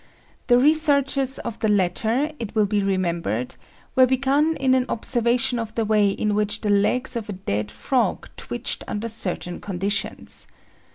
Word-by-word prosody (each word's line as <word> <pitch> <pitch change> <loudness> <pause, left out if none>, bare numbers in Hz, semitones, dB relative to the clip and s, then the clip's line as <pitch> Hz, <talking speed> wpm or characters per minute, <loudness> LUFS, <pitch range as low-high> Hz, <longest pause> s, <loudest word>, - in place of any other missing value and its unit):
The 245 - +6
researches 280 -2 +2
of 230 0 -6
the 220 - 0
latter, 220 - +1
it 230 -1 -6
will 215 -1 +4
be 205 0 0
remembered, 170 - -1 0.4
were 255 0 +6
begun 275 +5 +2
in 265 -1 +3
an 260 -1 +2
observation 240 +2 +1
of 225 -1 -5
the 225 - 0
way 210 -1 +3
in 210 +1 -1
which 210 0 -1
the 210 - 0
legs 205 +6 +2
of 225 -3 -4
a - - -2
dead 105 - -3
frog 110 - -1
twitched - - -3
under 210 +2 -3
certain 180 -5 -3
conditions. 200 +1 -3
220 Hz, 160 wpm, -23 LUFS, 200-255 Hz, 0.4 s, The